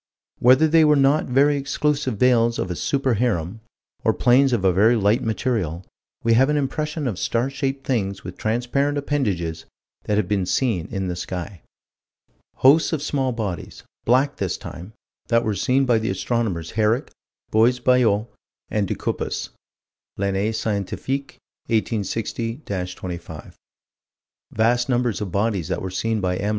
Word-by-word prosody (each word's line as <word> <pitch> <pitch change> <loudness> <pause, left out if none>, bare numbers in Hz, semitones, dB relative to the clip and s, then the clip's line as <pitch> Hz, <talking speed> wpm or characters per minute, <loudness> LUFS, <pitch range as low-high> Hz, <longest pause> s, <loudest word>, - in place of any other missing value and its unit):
Whether 130 +6 +5
they 160 +1 +5
were 150 -1 +5
not 140 +2 +3
very 140 +3 +3
exclusive 145 -3 -1
veils 120 -1 +3
of 90 - -2
a - - -3
super 135 - 0
harem, 105 -4 -1 0.4
or - - +2
planes 130 +2 +4
of 110 -6 0
a 95 - +4
very 110 +6 +4
light 105 +1 +2
material, 110 -7 -2 0.4
we 115 - +3
have 130 +5 +4
an 150 - +2
impression 150 +1 -2
of 100 -7 -3
star 120 +7 0
shaped 135 0 -3
things 100 -6 -1
with 90 0 -7
transparent 125 +6 0
appendages 100 - -2 0.4
that 105 - 0
have 105 -4 +1
been 95 -3 0
seen 105 -8 0
in 95 -3 -3
the 90 - -3
sky. 90 +1 -6 0.9
Hosts 155 +6 +4
of 150 -3 -1
small 135 -4 0
bodies 105 -8 -5 0.2
black, 130 +4 +2
this 95 -3 -2
time 90 +6 -9 0.3
that 115 0 +2
were 110 - 0
seen 130 +8 +1
by 120 -3 +3
the 110 +2 -2
astronomers 105 -9 -2
Herrick, 110 +4 +1 0.4
Buys 115 +3 +4
Ballot, 120 -4 +3 0.5
and 105 -2 0
De - - -2
Cuppis - - -3 0.7
(L'Année 100 +2 0
Scientifique, 115 +7 -3 0.3
1860 115 +3 -2 0.3
25); 85 -3 -8 1.0
vast 120 +3 +1
numbers 120 -4 0
of 100 -4 -4
bodies 100 -3 0
that 95 - -2
were 95 - -4
seen 110 +4 -1
by 90 -2 -1
M. 100 +2 -2
115 Hz, 155 wpm, -22 LUFS, 100-130 Hz, 1.0 s, Whether